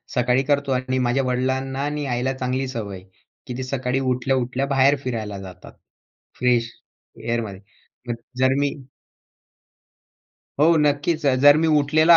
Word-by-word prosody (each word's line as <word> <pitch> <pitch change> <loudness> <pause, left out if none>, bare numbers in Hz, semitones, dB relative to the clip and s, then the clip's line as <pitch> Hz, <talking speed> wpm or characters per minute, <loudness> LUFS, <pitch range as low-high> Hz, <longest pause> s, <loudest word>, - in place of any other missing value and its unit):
सकाळी 125 +1 +2
करतो 140 0 0
आणि 130 0 0
माझ्या 125 +2 +1
वडिलांना 130 +1 -1
आणि 150 0 -3
आईला 125 +2 -1
चांगली 130 +1 -1
सवय 110 -6 -5
आहे, 90 - -15 0.4
की 125 -2 -5
ते 130 - -3
सकाळी 130 0 -1
उठल्या-उठल्या 130 0 0
बाहेर 140 +1 +4
फिरायला 110 -5 -4
जातात. 95 -1 -11 0.7
फ्रेश 120 -2 +2 0.5
एअरमध्ये. 110 -5 -3 0.5
मग 120 - -1 0.2
जर 130 0 +4
मी 145 0 +1 1.9
हो 165 +2 +5
नक्कीच. 150 +2 +1
अ, 135 - +4
जर 145 0 +9
मी 160 +1 +2
उठलेला 155 +4 +5
130 Hz, 140 wpm, -22 LUFS, 125-140 Hz, 1.9 s, जर